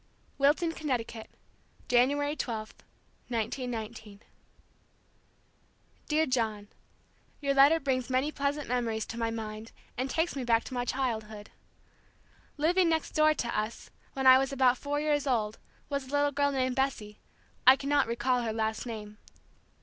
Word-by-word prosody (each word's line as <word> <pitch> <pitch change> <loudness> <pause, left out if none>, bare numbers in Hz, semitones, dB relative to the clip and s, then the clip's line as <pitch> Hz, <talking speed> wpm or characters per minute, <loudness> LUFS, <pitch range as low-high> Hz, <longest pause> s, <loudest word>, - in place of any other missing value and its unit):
Wilton, 300 +5 +3
Connecticut, 245 -8 -4 0.6
January 285 +4 +2
12, 220 -6 -4 0.5
1919. 225 -3 -4 1.9
Dear 310 +1 +3
John: 220 -6 -1 0.7
Your 280 -1 0
letter 280 +4 +6
brings 260 -4 -1
many 260 +4 +1
pleasant 285 0 -2
memories 230 -3 -1
to 230 - -7
my 230 -1 0
mind 220 0 -6 0.3
and 260 +1 -1
takes 325 +4 0
me 270 - -3
back 230 -1 +2
to - - -9
my 245 -1 -1
childhood. 220 -5 -3 1.1
Living 340 +4 +3
next 320 -1 0
door 310 0 +4
to 235 -4 -3
us, 215 +2 -4 0.2
when 265 -1 -3
I 260 0 +9
was 270 0 -1
about 255 -2 +3
four 290 0 -2
years 295 -1 0
old, 220 -4 0 0.3
was 280 -2 -3
a - - -11
little 290 0 +2
girl 285 0 +1
named 260 -2 0
Bessie; 235 -6 -2 0.5
I 260 - +10
cannot 285 0 +1
recall 245 +2 0
her 225 -2 -2
last 220 +1 -2
name. 210 -2 -7
255 Hz, 140 wpm, -29 LUFS, 225-285 Hz, 1.9 s, I